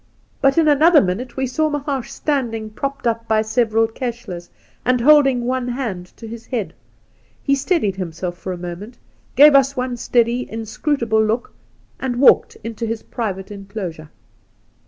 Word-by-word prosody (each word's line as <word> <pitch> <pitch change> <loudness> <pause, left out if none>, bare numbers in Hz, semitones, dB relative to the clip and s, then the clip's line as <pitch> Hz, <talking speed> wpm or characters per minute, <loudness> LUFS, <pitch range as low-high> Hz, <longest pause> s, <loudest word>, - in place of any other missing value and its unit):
But 275 +1 +3
in 325 -2 +4
another 305 +3 +6
minute 225 +6 -2
we 265 - 0
saw 310 +5 0
Mahaash 280 -4 -3
standing 230 -7 -2
propped 275 +4 -4
up 230 0 -1
by 220 0 +2
several 225 0 +2
kehles, 225 -7 -6 0.3
and 250 0 +2
holding 270 -2 +5
one 255 0 -1
hand 230 -8 -4
to 225 - -9
his 230 +1 -9
head. 215 -10 -3 0.7
He 275 - +2
steadied 275 - 0
himself 175 -1 -4
for 185 +1 -6
a 180 - -4
moment, 180 +7 -8 0.4
gave 295 +3 +8
us 275 0 +4
one 250 -1 -2
steady, 240 +1 +1
inscrutable 225 +1 0
look, 225 +3 -1 0.5
and 260 -2 -2
walked 260 +3 +4
into 230 0 -4
his 225 0 -4
private 200 -5 -4
enclosure. 195 -6 -7
235 Hz, 155 wpm, -20 LUFS, 215-270 Hz, 0.7 s, gave